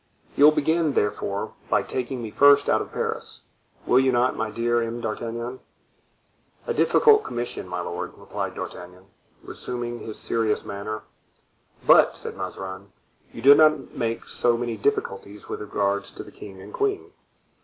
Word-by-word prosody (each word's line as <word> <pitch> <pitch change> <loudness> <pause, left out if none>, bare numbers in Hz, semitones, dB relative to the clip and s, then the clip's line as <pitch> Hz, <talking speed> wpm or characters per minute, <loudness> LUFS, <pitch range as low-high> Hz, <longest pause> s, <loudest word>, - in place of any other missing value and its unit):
"You 145 - +6
will 150 - +9
begin, 160 0 +1
therefore, 100 -2 -1 0.2
by - - +2
taking 130 -1 -4
me 110 - -6
first 145 +2 +6
out - - +3
of - - -7
Paris, - - -4 0.4
will 125 - +5
you 130 0 +3
not, 125 +1 +2
my 110 0 -2
dear 120 +1 0
M. 115 +1 -3
d'Artagnan?" 115 +2 -4 1.1
"A 470 - -1
difficult 440 -2 +5
commission, 120 -5 -4
my 90 0 -3
lord," 85 0 -5
replied - - -5
D'Artagnan, 90 +1 -8 0.4
resuming 120 -1 -5
his 110 - -7
serious 115 -2 0
manner. 100 +2 -5 0.8
"But," - - +6
said - - -6
Mazarin, 95 +1 -7 0.4
"you 115 - -10
did 140 +2 +9
not 155 -3 +3
make 115 0 -2
so 120 -1 +1
many 120 -1 -3
difficulties 100 -3 -2
with - - -5
regard 100 -1 0
to - - -8
the - - -14
king 95 -2 -11
and 95 - -11
queen." 410 -1 -1
115 Hz, 155 wpm, -24 LUFS, 100-130 Hz, 1.1 s, will